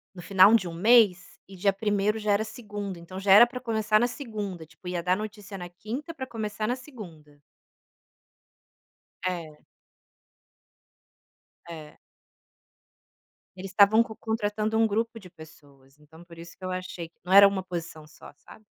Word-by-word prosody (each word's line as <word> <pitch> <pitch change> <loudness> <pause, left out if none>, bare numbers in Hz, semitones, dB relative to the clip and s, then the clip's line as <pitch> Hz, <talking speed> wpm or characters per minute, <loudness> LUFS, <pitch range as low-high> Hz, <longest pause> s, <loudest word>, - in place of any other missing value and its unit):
no 175 - -9
final 200 +3 +5
de 190 -6 +2
um - - -7
mês, 200 -1 +3
e 195 - -12
dia 195 +2 +2
primeiro 210 +1 -1
já 210 0 -2
era 210 +2 +1
segunda, 205 -5 -7
então, 185 +3 -10
já 195 0 +2
era 225 +4 +9
pra 250 -1 -7
começar 220 -3 +1
na 240 - +2
segunda, 210 - -6
tipo, 170 +3 -20
ia 175 -1 -3
dar 180 +1 +1
notícia 210 -2 -8
na 175 0 -7
quinta 240 - -7
pra 260 -3 -6
começar 215 -2 -4
na 250 - -1
segunda. 170 - -13 1.8
É. 170 -4 -5 2.0
É. 155 -3 -10 1.6
Eles 190 +1 -8
estavam 205 +4 +5
co 220 -2 -9
contratando 220 0 -2
um 225 0 +4
grupo 225 +2 -2
de 180 -2 -14
pessoas, 145 -4 -17
então, 160 +3 -17
por 170 -1 -15
isso 170 0 -12
que 185 - -12
eu 185 - -3
achei 185 -2 -6 0.2
não 185 - -4
era 200 0 +10
uma 195 -1 -1
posição 170 -3 -7
só, 155 - -15
sabe. 215 +8 -17
200 Hz, 160 wpm, -26 LUFS, 175-220 Hz, 2.0 s, era